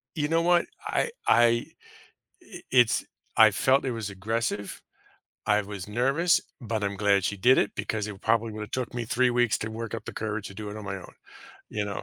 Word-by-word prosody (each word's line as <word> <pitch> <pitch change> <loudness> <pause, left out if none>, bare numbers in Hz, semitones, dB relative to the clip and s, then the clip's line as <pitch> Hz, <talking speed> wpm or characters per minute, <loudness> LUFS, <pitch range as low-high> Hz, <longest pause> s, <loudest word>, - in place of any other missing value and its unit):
You 150 -1 0
know 165 +1 +2
what? 175 0 +3 0.2
I 475 - 0 0.2
I 120 - +6
i 120 0 +3 1.1
it's 125 -3 +4 0.3
I - - +8
felt 135 +1 +2
it 130 - -1
was 110 -3 -4
aggressive. 105 +1 -3 0.7
I 105 0 +3
was 100 -2 -7
nervous, 140 - +2 0.2
but 110 -2 -2
I'm 100 0 -1
glad 100 -1 +2
she 105 - -1
did 125 +7 +5
it - - +2
because 110 -1 -2
it 100 -2 -8
probably 115 0 +1
would 105 - -6
have 105 - -7
took 125 -2 -3
me 120 - -2
3 125 +2 +2
weeks 120 -3 +2
to 110 - -3
work 115 0 -6
up 110 -2 -5
the - - -7
courage 110 -1 -3
to - - -10
do 105 +1 -6
it 105 - -7
on 105 - -8
my 95 0 -3
own, 90 - -12 0.6
you 105 - -2
know? 100 -2 -5
110 Hz, 215 wpm, -27 LUFS, 105-125 Hz, 1.1 s, I